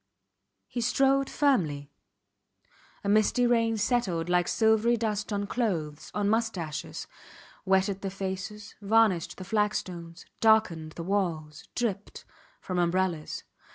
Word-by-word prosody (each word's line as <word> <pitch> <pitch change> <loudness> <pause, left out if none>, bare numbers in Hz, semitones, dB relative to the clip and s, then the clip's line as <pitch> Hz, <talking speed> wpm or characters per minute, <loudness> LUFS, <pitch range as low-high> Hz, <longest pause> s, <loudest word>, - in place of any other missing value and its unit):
He 240 - -4
strode 270 +3 +2
firmly. 155 - +1 1.1
A - - -4
misty 215 +4 +3
rain 230 -2 +2
settled 190 -8 0
like 180 0 +2
silvery 220 +1 +3
dust 215 -2 -2
on 205 0 -1
clothes, 170 -10 -2
on 205 -1 +1
moustaches; 205 -8 -2 0.6
wetted 190 +1 +2
the 195 - -2
faces, 195 +2 -5
varnished 205 -4 +2
the 185 - -7
flagstones, 180 -5 -2
darkened 185 -8 +3
the 170 - -6
walls, 165 -5 -2
dripped 210 -5 -3 0.4
from 185 -1 -2
umbrellas. 175 -2 0
200 Hz, 115 wpm, -28 LUFS, 175-225 Hz, 1.1 s, misty